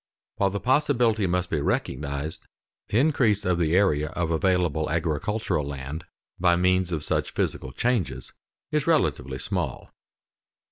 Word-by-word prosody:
While 100 - +3
the 100 +1 -3
possibility 120 -4 +2
must 90 0 -1
be 75 - 0
recognized, 70 +2 -2 0.4
the 105 - 0
increase 125 -7 +3
of 90 -1 +1
the 85 0 +2
area 75 -7 +3
of 85 +1 -2
available 85 -2 +1
agricultural 80 +3 -1
land 70 +2 -6 0.3
by 85 -1 +4
means 90 0 +2
of 80 -3 -2
such - - 0
physical 65 - -2
changes 90 - -1 0.4
is - - 0
relatively 65 0 +1
small. - - -3
85 Hz, 135 wpm, -26 LUFS, 75-100 Hz, 0.4 s, by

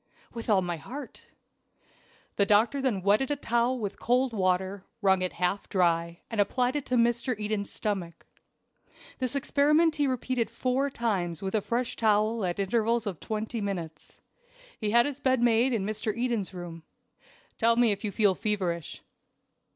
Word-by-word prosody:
"With 230 -1 -6
all 195 -3 +4
my 175 -1 -3
heart." 260 - -9 1.1
The 200 - +3
doctor 230 +7 +3
then 225 -9 0
wetted 210 +7 +3
a 290 - +1
towel 240 -1 0
with 205 -4 -5
cold 250 +1 +1
water, 190 0 0 0.2
wrung 190 -3 +3
it 185 - -2
half 180 +3 -1
dry, 170 -3 +1
and 225 -3 0
applied 250 +5 0
it 290 - -3
to 250 - 0
Mr. 235 0 +1
Eden's 210 -1 -2
stomach. 185 -6 -4 0.9
This 255 0 -1
experiment 300 +3 +3
he 290 -1 +2
repeated 255 -2 -1
four 260 +2 0
times 195 - -2
with 190 - -3
a 215 - +2
fresh 235 +3 -2
towel 215 0 +2
at 175 -2 -1
intervals 225 +3 +1
of 190 -6 -4
twenty 220 +1 -4
minutes. 170 -6 -6 0.6
He 215 - -1
had 235 +2 +5
his 285 -1 -4
bed 260 -2 +2
made 240 +2 +3
in 220 -5 0
Mr. 215 +1 -2
Eden's 235 -6 -1
room. 175 -3 -8 0.8
"Tell 230 +1 +4
me 235 -2 +4
if 200 +1 -3
you 210 - -1
feel 205 -2 +3
feverish." 185 -6 -2
220 Hz, 165 wpm, -28 LUFS, 195-245 Hz, 1.1 s, had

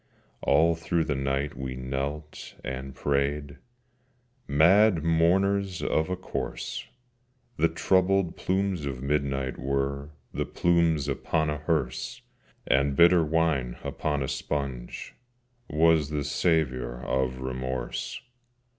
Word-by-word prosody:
All 80 +4 +4
through 80 +1 0
the 75 - -1
night 70 +1 -1
we 65 -1 -5
knelt 70 +4 -5
and 65 +1 -5
prayed, 70 +1 -1 0.9
Mad 85 +5 +5
mourners 95 +3 +2
of 80 +3 +1
a 90 - 0
corse! 90 - -5 0.7
The 80 - +4
troubled 95 +2 +2
plumes 95 -5 -1
of 65 -2 -5
midnight 70 -2 -1
were 70 +1 -1 0.2
The - - -2
plumes 85 -4 +2
upon 75 +2 0
a 75 - -3
hearse: 75 -3 -2 0.4
And 70 +1 +2
bitter 85 +1 +6
wine 75 -6 +1
upon 75 -2 -1
a - - -3
sponge 65 -5 -4 0.6
Was 80 -1 +3
the 75 -1 -1
savour 65 -6 0
of 65 -1 0
Remorse. 65 -1 -4
75 Hz, 110 wpm, -27 LUFS, 70-85 Hz, 0.9 s, bitter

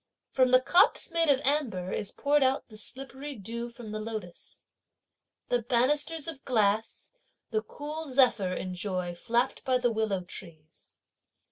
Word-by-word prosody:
From 255 -1 +3
the 255 0 +7
cups 350 +7 +4
made 330 -2 +2
of 275 -2 +5
amber 240 -11 0
is 200 - -2
poured 290 +1 +2
out 265 -1 +1
the 215 - -13
slippery 270 +4 -6
dew 230 +3 -5
from 235 -2 -10
the 215 - -3
lotus. 215 -5 -6 0.8
The 245 -1 +2
banisters 285 +7 +1
of 310 -4 -6
glass, 220 -3 0 0.4
the 215 -1 +1
cool 300 +7 -6
zephyr 250 -8 +3
enjoy 185 -1 -3
flapped 235 +8 0
by 255 -1 +2
the 245 -1 +1
willow 215 -4 0
trees. 160 -3 -11
240 Hz, 145 wpm, -29 LUFS, 205-270 Hz, 0.8 s, the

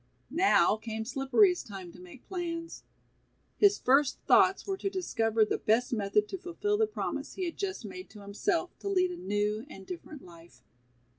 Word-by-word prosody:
Now 335 - +4
came 220 0 -5
Slippery's 280 - +3
time 190 -4 -9
to 180 - -15
make 180 +7 -13
plans. 335 -3 -5 0.8
His 410 0 +5
first 275 +2 +3
thoughts 380 - +4
were 390 - -1
to 395 - -2
discover 225 - +1
the - - -2
best 235 +4 +1
method 210 -1 +1
to 385 - -5
fullfil 415 +4 -1
the 440 - +3
promise 425 - -4
he 375 - -2
had 340 - -4
just 390 -1 -4
made 370 0 -8
to 210 - -13
himself 330 - -2
to 400 - -4
lead 365 -2 +2
a - - -5
new 210 - -1
and 195 -9 -11
different 315 -5 -9
life. 170 -7 -16
275 Hz, 175 wpm, -30 LUFS, -, 0.8 s, His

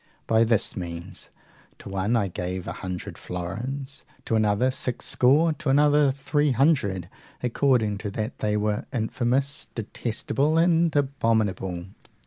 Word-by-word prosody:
By 110 0 +4
this 115 -2 +2
means, 85 +1 -6 0.5
to - - -12
one 100 +4 0
I 105 -4 +2
gave 90 0 -4
a - - -2
hundred 90 -2 -6
florins, 125 +11 -5 0.2
to - - -2
another 110 +4 +2
six 125 -1 -3
score, 150 +6 +4
to 150 - -4
another 145 0 +4
three 145 +1 0
hundred, 115 - +2 0.4
according 120 -4 +2
to 105 - -4
that 110 +3 -4
they 105 0 0
were 105 0 -1
infamous, 125 +4 -1
detestable, 120 +6 -1
and 165 -1 +3
abominable. 110 -10 0
115 Hz, 130 wpm, -25 LUFS, 100-140 Hz, 0.5 s, By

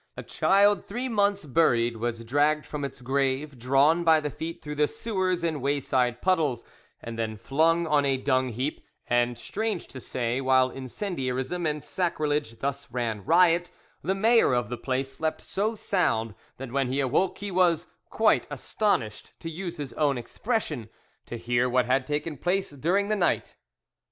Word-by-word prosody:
A - - -5
child 200 +1 +3
three 245 +5 -4
months 200 -5 +1
buried 120 -6 +2
was 115 0 -3
dragged 145 +5 +2
from 150 -1 -5
its 135 -1 -6
grave, 135 +1 -1
drawn 140 +7 +3
by 160 -1 +5
the 150 -1 -3
feet 165 +4 -6
through 150 -2 -6
the 150 0 +2
sewers 185 -5 -2
and 160 -4 -1
wayside 130 -3 0
puddles, 155 -10 +1 0.4
and 115 0 -6
then 110 -1 -2
flung 160 +9 +2
on 150 -2 +3
a 135 -1 +1
dung 130 -1 +1
heap; 130 +6 -3 0.2
and, 120 0 +1
strange 220 - -3
to 130 - -8
say, 125 0 -2
while 130 -1 +3
incendiarism 135 - -3
and 150 -1 -2
sacrilege 150 -8 -1
thus 140 -1 -4
ran 115 -4 -2
riot, 175 +2 +4 0.3
the 190 - 0
mayor 225 - +4
of 120 - -1
the 120 - -3
place 130 +2 -2
slept 160 +3 -2
so 215 +3 -2
sound 115 - 0 0.2
that 130 -2 -7
when 135 0 +1
he 130 +3 -1
awoke 140 +8 +1
he 205 0 -5
was 175 -2 +3 0.2
"quite - - +2
astonished," 115 - -2
to 165 - -6
use 175 +1 -5
his 145 -4 -6
own 145 -3 +1
expression, 145 - -3 0.4
to 120 - -5
hear 120 +2 +1
what 125 0 +2
had 130 +1 +1
taken 150 +1 -2
place 190 +1 0
during 175 +8 0
the 215 - +2
night. 180 -4 0
145 Hz, 170 wpm, -27 LUFS, 125-175 Hz, 0.4 s, by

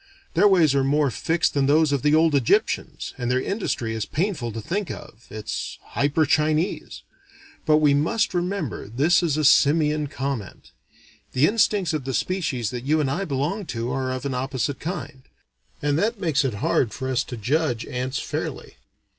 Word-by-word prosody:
Their 205 - +5
ways 170 -8 +4
are 135 -1 +2
more 140 0 +2
fixed 165 +6 0
than 140 -1 +1
those 155 +1 +4
of 140 -3 +1
the 150 +3 +3
old 160 0 +4
Egyptians, 135 -5 0
and 120 -1 -2
their 125 +1 +2
industry 130 - -2
is 110 -1 -2
painful 155 - -2
to 115 - -5
think 180 - -3
of, 110 +3 -10
it's 110 0 -5
hyper 145 +3 +1
Chinese. 155 +5 0 0.6
But 155 -1 +5
we 150 -2 +4
must 165 +11 +1
remember 175 - -2
this 145 - +3
is 160 -4 0
a 155 - +1
simian 150 +1 +4
comment. 135 -6 -5 0.6
The 130 +3 +4
instincts 200 -3 +2
of 150 -4 -3
the 135 -2 -2
species 135 - -1
that 125 -1 -5
you 155 +4 +2
and 140 -3 0
I 185 +8 -1
belong 160 +7 -2
to 115 +2 -2
are 130 0 -2
of 130 +1 -4
an 140 - -2
opposite 130 +1 -2
kind; 155 -5 -5 0.6
and 145 +1 +1
that 220 +3 0
makes 160 -7 +1
it 130 -6 -1
hard 105 +2 +1
for 130 -1 -4
us 130 -1 +1
to 125 - -7
judge 125 +1 0
ants 130 +2 -3
fairly. - - -5
145 Hz, 180 wpm, -24 LUFS, 130-160 Hz, 0.6 s, Their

